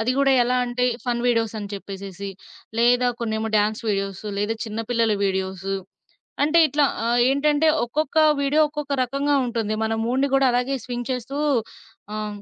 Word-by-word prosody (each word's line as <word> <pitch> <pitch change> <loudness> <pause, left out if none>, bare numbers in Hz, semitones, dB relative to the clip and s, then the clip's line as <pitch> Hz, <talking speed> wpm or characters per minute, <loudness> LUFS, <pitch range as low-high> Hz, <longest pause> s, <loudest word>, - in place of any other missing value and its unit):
అది 225 +3 +1
గూడా 275 -1 +4
ఎలా 250 +1 +1
అంటే 245 +1 -1 0.2
ఫన్ 240 -1 -1
వీడియోసని 225 -3 0
చెప్పేసేసి, 195 0 -7 0.5
లేదా 245 +1 +4
కొన్నేమో 220 -1 -2
డాన్స్ 210 +1 0
వీడియోసు, 195 0 -2
లేదా 205 +2 0
చిన్న 220 0 -4
పిల్లల 230 -2 +2
వీడియోసు. 190 0 -2 0.7
అంటే 310 +3 +4
ఇట్లా 295 0 +1 0.2
ఆహ్, 240 +1 +2
ఏంటంటే 295 +3 +2 0.2
ఒక్కొక్క 300 +5 -2 0.2
వీడియో 285 +2 +3
ఒక్కొక్క 295 -1 -4
రకంగా 275 +3 0
ఉంటుంది. 225 -3 -2
మన 220 0 0
మూడ్‌ని 260 +4 +1
గూడా 270 0 +4
అలాగే 250 +3 0
స్వింగ్ 245 0 -5
చేస్తూ 255 +2 -4 0.8
ఆ! - - -3
హ్మ్ 205 - -7
240 Hz, 155 wpm, -23 LUFS, 215-275 Hz, 0.8 s, గూడా